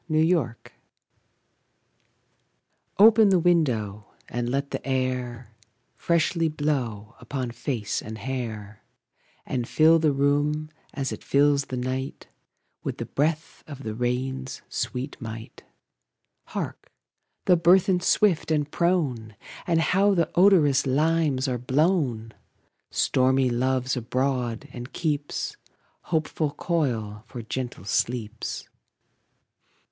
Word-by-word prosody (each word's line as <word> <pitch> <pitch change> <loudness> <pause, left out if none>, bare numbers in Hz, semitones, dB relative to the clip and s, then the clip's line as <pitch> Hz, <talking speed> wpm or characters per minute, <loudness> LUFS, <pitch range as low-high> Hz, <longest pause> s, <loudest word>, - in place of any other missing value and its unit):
Nelson] 155 -5 +2 2.4
OPEN 220 0 +7
the 190 - +5
window, 120 - +1 0.2
and 120 0 -3
let 140 +2 -2
the - - -4
air 125 -3 -2 0.4
Freshly 165 -1 +1
blow 125 -8 -2
upon 130 -4 -4
face 120 -3 -3
and 110 0 -7
hair, 110 -5 -5 0.6
And 125 -2 -2
fill 160 +1 +5
the 155 -2 +3
room, 145 +2 +1 0.2
as 135 -2 -3
it - - -7
fills 140 0 +3
the 130 - -5
night, 130 +2 -4 0.5
With - - -4
the - - -4
breath 155 +2 -2
of 140 -3 -9
the 110 - -4
rain's 130 +2 -3
sweet 130 +3 -4
might. 110 -1 -8 0.8
Hark! - - -6 0.5
the 180 - +6
burthen, 180 +2 +4
swift 180 -2 +2
and 150 -2 0
prone! 140 - 0 0.3
And 170 -2 +3
how 195 +4 +3
the 170 -2 +1
odorous 160 -8 +5
limes 150 -1 +2
are 125 -2 -1
blown! 130 - +1 0.6
Stormy 130 0 +2
Love's 130 +1 0
abroad, 125 -1 -1
and 125 +2 -8
keeps 150 -3 -2 0.5
Hopeful 155 -2 -1
coil 115 -11 -1
for 120 -1 -7
gentle 125 -2 -5
sleeps. 110 +2 -2
135 Hz, 110 wpm, -25 LUFS, 120-155 Hz, 2.4 s, OPEN